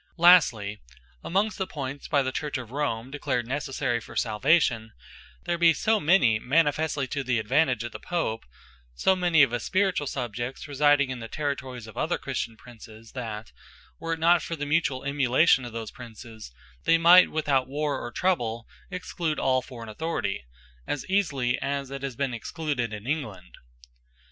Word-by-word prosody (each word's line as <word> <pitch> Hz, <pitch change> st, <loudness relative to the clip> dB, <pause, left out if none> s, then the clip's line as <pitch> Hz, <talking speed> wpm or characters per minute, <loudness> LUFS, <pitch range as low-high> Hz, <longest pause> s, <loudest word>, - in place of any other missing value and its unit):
Lastly, 130 Hz, -, +5 dB, 0.4 s
amongst 200 Hz, +5 st, 0 dB
the 190 Hz, -, -1 dB
points 140 Hz, -1 st, -6 dB
by 140 Hz, -3 st, +2 dB
the 130 Hz, -, -2 dB
Church 145 Hz, +1 st, -3 dB
of 120 Hz, -3 st, -8 dB
Rome 130 Hz, -4 st, -2 dB
declared 140 Hz, -4 st, -2 dB
necessary 130 Hz, -2 st, -2 dB
for -, -, -12 dB
Salvation, 120 Hz, 0 st, +2 dB, 0.5 s
there 175 Hz, -1 st, -2 dB
be 170 Hz, -1 st, +6 dB
so 220 Hz, 0 st, +2 dB
many, 145 Hz, -, +4 dB
manifestly 145 Hz, +1 st, +1 dB
to 140 Hz, +1 st, -2 dB
the 125 Hz, -2 st, 0 dB
advantage 125 Hz, +2 st, +1 dB
of 120 Hz, -, -5 dB
the -, -, -8 dB
Pope, 165 Hz, -11 st, -2 dB, 0.6 s
and 180 Hz, -3 st, +3 dB
of 140 Hz, -6 st, +6 dB
his 120 Hz, -, -2 dB
spirituall 190 Hz, -6 st, +1 dB
subjects, 120 Hz, +1 st, -4 dB
residing 145 Hz, -1 st, +3 dB
in 130 Hz, -, -5 dB
the 115 Hz, -, -7 dB
territories 130 Hz, -4 st, -4 dB
of 110 Hz, -, -12 dB
other -, -, 0 dB
Christian 115 Hz, -, -4 dB
Princes, 115 Hz, -1 st, -14 dB
that 110 Hz, -4 st, -6 dB, 0.5 s
were 165 Hz, 0 st, -2 dB
it 165 Hz, -, -5 dB
not 170 Hz, +1 st, +4 dB
for 165 Hz, -, -4 dB
the 145 Hz, -2 st, -4 dB
mutuall 145 Hz, -4 st, 0 dB
emulation 135 Hz, 0 st, +3 dB
of 120 Hz, -, -7 dB
those 115 Hz, -1 st, -6 dB
Princes, 115 Hz, -, -11 dB, 0.3 s
they 165 Hz, -, +5 dB
might 175 Hz, +2 st, +7 dB
without 140 Hz, -4 st, +1 dB
warre, 145 Hz, +1 st, -2 dB
or 120 Hz, -, -6 dB
trouble, 120 Hz, -10 st, -1 dB, 0.2 s
exclude 175 Hz, -4 st, -3 dB
all 130 Hz, -1 st, +2 dB
forraign 120 Hz, -3 st, -10 dB
Authority, 110 Hz, -, -3 dB, 0.4 s
as 145 Hz, -, -3 dB
easily 140 Hz, -11 st, +1 dB
as 140 Hz, -1 st, -3 dB
it 140 Hz, -1 st, -5 dB
has 135 Hz, -3 st, -4 dB
been 135 Hz, -1 st, -2 dB
excluded 125 Hz, -1 st, -3 dB
in 105 Hz, 0 st, -7 dB
England. 110 Hz, -, -4 dB
135 Hz, 165 wpm, -26 LUFS, 120-160 Hz, 0.6 s, might